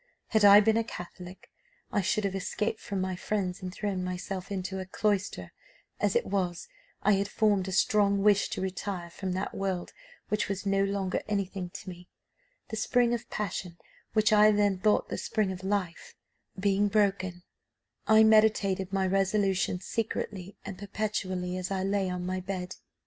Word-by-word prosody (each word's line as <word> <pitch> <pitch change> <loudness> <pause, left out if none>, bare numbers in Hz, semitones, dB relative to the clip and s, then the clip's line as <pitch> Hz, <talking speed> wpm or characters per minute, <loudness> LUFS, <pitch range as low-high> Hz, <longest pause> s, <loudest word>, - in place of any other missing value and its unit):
Had 220 -2 +2
I 205 0 +9
been 220 +1 +3
a 230 - +2
Catholic, 180 -3 -10 0.4
I 205 - +1
should 210 +2 0
have 200 -1 -1
escaped 210 +3 -2
from 195 -2 -3
my 185 0 -2
friends 185 -1 -2
and 185 -1 -5
thrown 195 -1 -3
myself 185 +1 -5
into 190 0 -3
a 185 - -4
cloister; 200 0 -1 0.5
as - - +1
it 475 - +2
was, 180 -3 -2 0.4
I 210 - +4
had 200 0 +2
formed 205 -3 +1
a - - -3
strong 200 +1 +3
wish 205 -1 +4
to - - -4
retire 185 -2 -4
from 185 +1 -4
that 185 - -3
world 190 -2 -3 0.4
which 210 -1 0
was 195 0 -3
no 195 0 +2
longer 195 -2 -1
anything 195 -3 -2
to 175 - -10
me: 180 -1 -9 0.6
the 220 - -4
spring 240 +1 +2
of 240 0 -4
passion, 180 -4 -4 0.4
which 215 -1 +3
I 210 0 +7
then 205 -2 +2
thought 210 +2 +2
the - - -3
spring 210 -4 0
of 185 0 -7
life, 190 -3 -2 0.4
being 200 +1 +2
broken, 195 -4 0 0.6
I 220 0 +7
meditated 215 -4 +3
my 195 -1 +1
resolution 195 -1 +1
secretly 200 -2 -4
and 195 -2 -7
perpetually 190 -3 -3
as 185 0 -3
I 190 -1 -1
lay 195 -1 0
on 180 0 -3
my 185 +1 -2
bed. 185 -1 -5
195 Hz, 170 wpm, -29 LUFS, 185-210 Hz, 0.6 s, I